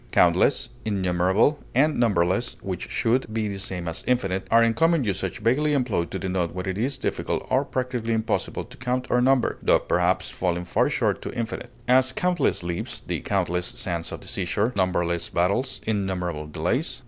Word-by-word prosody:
Countless, - - +3
innumerable, 95 +6 +2 0.2
and 150 +3 +3
numberless, 100 0 +1
which 95 -3 -4
should 115 0 0
be 110 -1 -1
the 100 -1 -4
same 90 -3 -3
as 80 - -3
infinite, 95 -7 0
are 115 +1 +6
in 115 0 +3
common 165 +1 +3
usage 95 -4 -2
vaguely 145 +6 +2
employed 115 - 0
to - - -4
denote 90 -2 -2
what 90 - -3
it 95 -1 -2
is 130 +7 -1
difficult - - -2
or 130 +2 +3
practically 125 -4 -2
impossible 110 0 -1
to - - -15
count 125 +1 -1
or 125 - +4
number, 130 0 +2
tho - - +5
perhaps - - +1
falling 90 -1 -1
far - - +2
short - - 0
of - - -5
infinite; 120 0 -4 0.2
as, 130 +1 +4
countless 175 - +1
leaves, 85 0 -4
the - - -2
countless 90 +1 -1
sands 85 -2 -3
on - - -6
the - - -11
seashore, 100 +5 0
numberless 85 -3 0
battles, 100 +10 0
innumerable 90 -7 -2
delays. 90 - -1
105 Hz, 175 wpm, -25 LUFS, 90-125 Hz, 0.2 s, are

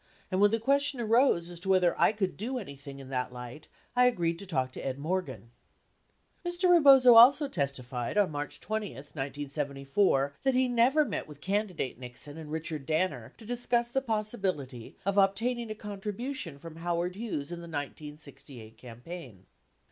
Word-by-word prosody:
And 185 +1 +1
when 205 - +7
the 225 +2 0
question 280 +2 +2
arose 230 -6 +3
as 175 - -9
to 190 +2 -5
whether 185 -2 +4
I - - +6
could 205 -3 -2
do 250 +6 -3
any 185 - -7
thing 140 0 -10
in 135 -1 -10
that 125 -1 -2
light, 125 +4 -9 0.3
I 250 0 +5
agreed 170 -8 0
to 200 - -9
talk 130 -7 -1
to - - -8
Ed 130 -1 -3
Morgan." 140 - -3 0.9
4S 350 -1 -3
Mr. 360 0 +4
Rebozo 275 -7 +8
also 260 +6 +8
testified 135 - -3
on 200 -5 +3
March 145 0 -5
20, 215 -2 -4
1974, 140 +2 -1
that 265 -1 +1
he 255 0 +3
never 250 +5 +3
met 215 - -4
with 150 -2 -12
candidate 190 - -2
Nixon 130 +5 -6
and 155 -2 -9
Richard 155 -3 -4
Danner 155 -8 -1
to 225 - -13
discuss 240 0 0
the 270 +2 0
possibility 195 - -3
of 200 +1 +2
obtaining 230 +4 +1
a 215 - -4
contribution 210 - -5
from 165 +2 -11
Howard 175 +1 -2
Hughes 190 -9 -4
in 175 - -5
the 170 - -9
1968 145 -6 -8
campaign. 125 - -10
175 Hz, 170 wpm, -29 LUFS, 140-225 Hz, 0.9 s, Rebozo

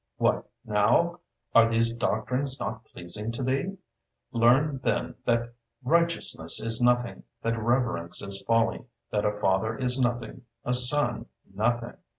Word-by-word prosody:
——"What - - +1 0.2
now? 115 +12 +2 0.3
are 115 0 +6
these 115 0 +2
doctrines 125 +4 -2
not 110 +3 -5
pleasing 105 +6 -6
to 130 - -4
thee? 135 +10 -1 0.5
Learn, 130 +4 +3
then, 125 +1 -1
that 120 0 0 0.3
Righteousness 165 - +1
is 115 +2 0
nothing, 120 -1 +2 0.2
that 115 - +1
Reverence 110 -7 0
is 100 0 -5
folly, 115 0 +2 0.3
that 105 - 0
a 105 0 +1
father 105 +2 0
is 125 0 -1
nothing, 120 0 -2 0.2
a 125 - 0
son 125 +4 +4 0.3
nothing." 115 +3 -1
120 Hz, 135 wpm, -27 LUFS, 110-125 Hz, 0.5 s, are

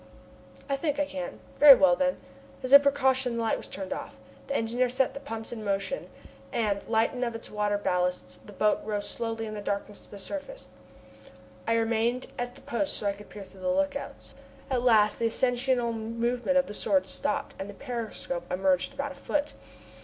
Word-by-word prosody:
"I 275 - +1
think 290 0 -1
I 290 - +2
can." 280 -2 -6 0.2
"Very 285 -2 +11
well, 265 -1 +5
then." 275 0 +1 0.5
As 255 +1 -1
a 280 - +13
precaution 265 -3 +2
the 230 - 0
light 225 - +2
was - - -8
turned 190 -1 -4
off. - - -7 0.3
The 275 - -2
engineer 240 +2 +1
set 255 +1 +1
the - - -6
pumps 225 -6 -6
in 225 -2 -6
motion, 200 - -2 0.4
and, 205 -3 0
lightened 230 +3 +1
of 235 -2 -2
its 225 - -7
water 210 -1 0
ballast, 180 - -1
the - - -10
boat 210 0 +2 0.2
slowly 225 +1 -3
rose - - -6
in - - -6
the 210 - -5
darkness 200 0 -3
to - - -20
the 205 - -9
surface. 300 - -6 1.0
I 230 - +3
remained 230 +2 +1
at 245 0 -4
my - - -17
post 285 +5 -1
so - - -5
that 200 - +3
I - - -15
could 210 - -13
peer 205 - -9
through 190 0 -16
the 275 - -1
lookouts. 280 0 -2 0.4
At 250 -2 +2
last 215 -4 +4
the 230 - +2
ascensional 245 0 +1
movement 235 +4 -1
of 275 - +4
the 205 - -8
Sword 285 +6 +2
stopped, 285 -1 -1
and 195 - -5
the 205 - -9
periscope 225 -9 -4
emerged 185 +6 +1
about 280 +1 -3
a - - -7
foot. 295 +1 -2
235 Hz, 200 wpm, -28 LUFS, 210-275 Hz, 1.0 s, a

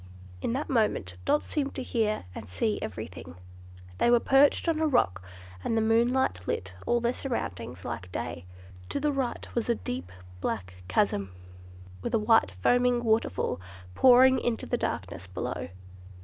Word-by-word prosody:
In - - -1
that 275 +4 -2
moment 215 - 0
Dot 295 - +2
seemed 280 -2 -2
to 260 - -2
hear 220 - 0
and 105 - -8
see 210 - 0
everything. 90 -4 -7 0.6
They - - +4
were 240 0 +6
perched 275 +6 +4
on 325 -2 +2
a 320 - +2
rock, 95 - +2 0.4
and 225 - 0
the - - +3
moonlight 225 - +2
lit 95 0 -2
all 240 - +3
their 240 +1 0
surroundings 125 - -4
like 115 -7 -5
day. 85 0 -5 0.4
To - - -1
the 295 +1 +1
right 270 -3 -2
was 235 0 -1
a 235 - +3
deep 90 - -5 0.3
black 90 0 -3
chasm, 95 +1 +1 0.7
with 240 - -1
a - - +5
white 220 - +4
foaming 245 - +2
waterfall 220 - 0 0.3
pouring 260 - +7
into 235 -2 -1
the - - 0
darkness 95 - -3
below. 90 -2 -4
225 Hz, 160 wpm, -28 LUFS, -, 0.7 s, pouring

